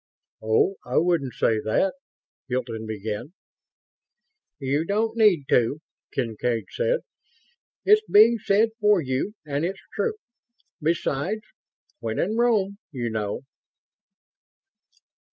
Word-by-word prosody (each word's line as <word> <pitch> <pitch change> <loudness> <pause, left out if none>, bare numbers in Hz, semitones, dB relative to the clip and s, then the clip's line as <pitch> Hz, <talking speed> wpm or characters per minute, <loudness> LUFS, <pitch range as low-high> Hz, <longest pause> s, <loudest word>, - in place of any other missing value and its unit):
"Oh, 110 - +2
I - - -2
wouldn't 160 -6 +1
say 110 -1 +2
that 110 - +1 0.3
..." - - -78
Hilton 120 -3 -3
began. 110 - -5 1.2
"You 140 +2 0
don't 220 +5 0
need 210 -9 +4
to," 125 +5 +3 0.3
Kincaid 115 -3 -1
said. - - 0 0.8
"It's 425 +1 +6
being 225 +3 +7
said 210 +3 +3
for 210 -2 +4
you 135 - -2
and 145 0 -2
it's 190 +3 -3
true. 460 - 0 0.7
Besides, 165 +5 0 0.6
'When 115 -2 -3
in 210 +5 0
Rome,' 210 -4 +2
you 120 -5 -3
know." 105 -2 -2
155 Hz, 110 wpm, -25 LUFS, -, 1.2 s, being